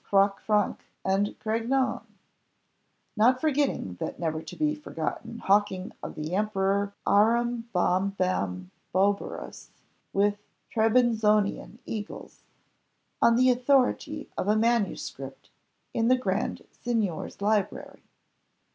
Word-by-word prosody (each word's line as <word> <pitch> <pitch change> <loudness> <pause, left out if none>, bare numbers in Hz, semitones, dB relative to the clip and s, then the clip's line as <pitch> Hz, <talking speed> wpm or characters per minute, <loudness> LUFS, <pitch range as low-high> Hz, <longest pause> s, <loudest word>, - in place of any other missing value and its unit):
Croc 195 0 +2
Franc 210 -2 +1 0.3
and 195 +2 +2
Craignon; 235 +4 0 1.1
not 245 +4 +4
forgetting 275 - 0
that - - -4
never 160 -2 -2
to - - -9
be 305 -1 +1
forgotten 230 - -5
hawking 200 -2 +1
of - - -7
the 155 +3 -4
Emperor 200 0 +1
Arambombamboberus 195 - 0 0.4
with 205 +1 +2 0.3
Trebizonian 220 -2 +2
eagles, 215 -1 -7 0.8
on 235 - +6
the 255 +1 +5
authority 275 +4 +1
of - - -2
a 210 - +4
manuscript 230 -1 -1 0.4
in 225 0 +1
the 255 +1 +5
Grand 200 -5 -2
Signior's 220 -8 -2
library. 205 0 -1
210 Hz, 95 wpm, -27 LUFS, 195-240 Hz, 1.1 s, on